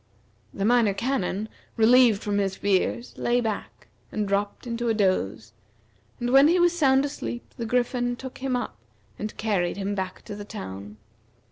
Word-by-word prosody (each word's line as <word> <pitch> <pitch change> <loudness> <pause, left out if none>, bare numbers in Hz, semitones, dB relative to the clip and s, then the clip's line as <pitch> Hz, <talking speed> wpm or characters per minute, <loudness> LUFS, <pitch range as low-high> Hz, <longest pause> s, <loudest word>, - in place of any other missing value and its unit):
The 195 - -2
Minor 230 -3 +4
Canon, 215 -3 -1 0.3
relieved 230 -1 +5
from 205 -1 0
his 195 -1 0
fears, 200 +4 0
lay 240 +1 +2
back, 220 -3 -4 0.3
and 210 -1 -1
dropped 200 +3 -1
into 235 0 -2
a 225 - +2
doze; 115 - 0 0.7
and 240 0 -1
when 275 +2 +7
he 350 +3 +4
was 350 0 +4
sound 270 -4 +4
asleep 275 -4 -6
the 230 -2 -4
Griffin 245 0 0
took 260 +1 -9
him 260 -1 -1
up, 245 - -4 0.4
and 215 0 -5
carried 195 -5 0
him 200 0 -2
back 190 -2 -4
to 205 - -7
the 205 - -7
town. 100 - -8
220 Hz, 165 wpm, -26 LUFS, 200-245 Hz, 0.7 s, when